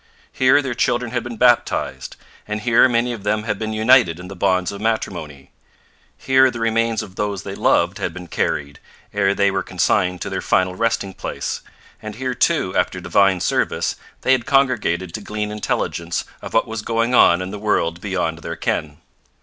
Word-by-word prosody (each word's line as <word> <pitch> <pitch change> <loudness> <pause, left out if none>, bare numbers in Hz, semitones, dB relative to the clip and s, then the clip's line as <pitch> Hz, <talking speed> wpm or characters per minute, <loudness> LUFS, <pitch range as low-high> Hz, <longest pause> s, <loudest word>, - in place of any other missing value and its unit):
Here 130 +3 +4
their 130 -2 -2
children 120 0 0
had 120 -2 -2
been 120 -2 -7
baptized, 120 0 +1 0.3
and 105 0 -3
here 120 +2 +5
many 120 0 +1
of 115 - -7
them 105 +1 0
had 105 -2 -3
been 110 0 -3
united 110 -5 +4
in 90 +1 -9
the 95 - -8
bonds 90 +1 +1
of 100 0 -8
matrimony. 85 -11 -3 0.7
Here 130 0 +4
the 120 - -6
remains 115 0 0
of 95 -1 -13
those 100 -3 -2
they - - -6
loved - - +1
had - - -2
been 90 -1 -9
carried, 70 -4 -2 0.3
ere 100 -1 +2
they 100 -1 +3
were 95 0 -1
consigned 90 0 0
to - - -3
their - - -2
final 95 0 +1
resting 100 -1 -1
place, - - -4 0.4
and 110 -1 -7
here, 130 +1 -2
too, 125 - +1
after 90 - 0
divine 95 +1 +2
service, - - 0 0.3
they - - +2
had 130 -3 +2
congregated 115 -11 +1
to 110 - -5
glean 105 0 -4
intelligence 85 -5 -2 0.2
of - - -8
what - - +4
was 110 -1 -4
going 115 +2 0
on 85 -7 +6
in 90 +1 -5
the 105 - -6
world 85 -5 0
beyond 90 -5 -2
their - - -6
ken. 75 -1 -2
105 Hz, 190 wpm, -20 LUFS, 90-115 Hz, 0.7 s, on